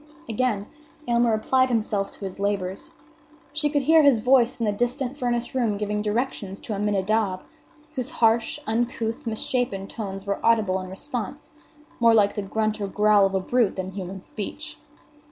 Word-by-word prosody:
Again 225 -3 0 0.4
Aylmer 235 -1 +3
applied 255 +4 +2
himself 215 -4 0
to 200 - -8
his 190 0 -7
labors. 200 -2 -2 0.6
She 300 0 +1
could 290 -1 +1
hear 320 +3 +6
his 280 -6 +5
voice 250 +1 +3
in 230 - 0
the 210 - +2
distant 245 +5 -1
furnace 240 -3 -1
room 235 -6 +1
giving 210 0 -1
directions 210 -3 -2
to 220 - -4
Aminadab, 205 -1 0 0.5
whose 255 -5 -3
harsh, 225 0 +2
uncouth, 230 0 -2
misshapen 220 -3 -1
tones 195 -3 -6
were 200 0 -2
audible 215 -5 +3
in 185 - -8
response, 250 +5 -5 0.5
more 230 -1 +6
like 205 -2 +4
the 205 - -3
grunt 215 +2 -1
or 200 - -1
growl 210 0 +4
of 195 - -4
a - - +3
brute 230 +2 +1
than 185 0 -4
human 190 0 -6
speech. 205 +1 -6
220 Hz, 165 wpm, -25 LUFS, 200-245 Hz, 0.6 s, hear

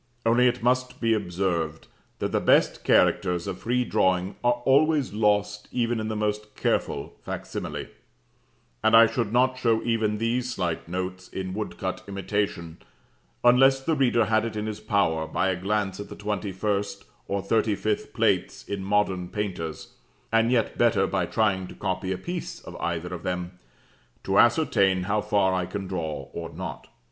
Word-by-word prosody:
Only 120 +2 +5
it 120 -1 -1
must 125 +1 +1
be 115 -1 +2
observed 90 -5 -1 0.3
that - - -2
the - - +2
best - - +3
characters 90 -1 +3
of 95 -2 -5
free 125 +1 0
drawing 95 -2 +1
are 120 0 +1
always 145 -2 +3
lost 105 -1 +1
even 120 -1 0
in 110 - -3
the 110 - -2
most 105 0 -2
careful - - -1
facsimile; - - -5 1.0
and 110 +1 +5
I 115 0 +9
should 115 -2 -1
not 130 +2 +2
show 115 -3 +2
even 110 -2 0
these 120 +3 -1
slight 85 -3 -2
notes 95 +1 -4
in 95 -1 -5
woodcut 95 -2 -4
imitation, 95 -4 -3 0.6
unless 135 +2 +6
the 145 +5 -1
reader 125 -5 +3
had 110 +1 +2
it 115 -1 -4
in 105 0 -2
his 110 -1 -4
power, 95 -7 +1
by 90 +4 0
a 95 - +1
glance 95 +1 -1
at 100 - -7
the - - -8
21st 100 0 -2 0.2
or 100 -1 -2
35th 110 0 0
plates - - 0
in 100 -1 -4
Modern 95 -3 0
Painters 90 -6 -4 0.4
(and 115 +1 +3
yet 120 -3 +1
better, 115 -5 +4
by 95 -2 -1
trying 95 -4 +1
to - - -11
copy 95 -1 -2
a 95 - -1
piece 175 - -5
of - - -10
either 85 +1 -3
of 85 - -5
them), 90 0 -4 0.6
to 95 0 +2
ascertain 100 - +3
how 105 +3 0
far 100 -3 +2
I 90 -1 -1
can 95 +2 -5
draw 80 -7 -4
or - - -5
not. - - -7
105 Hz, 165 wpm, -26 LUFS, 95-115 Hz, 1.0 s, I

